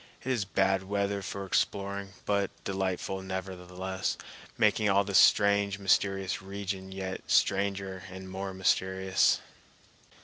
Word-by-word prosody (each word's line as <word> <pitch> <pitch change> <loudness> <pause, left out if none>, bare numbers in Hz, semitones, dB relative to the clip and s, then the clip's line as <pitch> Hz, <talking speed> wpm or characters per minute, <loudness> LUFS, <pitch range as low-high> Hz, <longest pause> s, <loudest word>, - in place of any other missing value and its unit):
It 130 - -1
is 115 -6 0
bad 95 0 +2
weather 100 0 -1
for 100 +1 -5
exploring 100 0 -1
but 100 -1 +1
delightful 95 0 -2
nevertheless, 95 0 -4 0.4
making 105 0 +3
all 100 +1 +4
the 100 0 -5
strange, 100 0 +5
mysterious 95 -1 +1
region 95 -1 -5
yet 95 -1 -4
stranger 95 -1 +1
and 95 0 -9
more 95 +1 -5
mysterious. 95 0 +2
95 Hz, 115 wpm, -29 LUFS, 95-100 Hz, 0.4 s, strange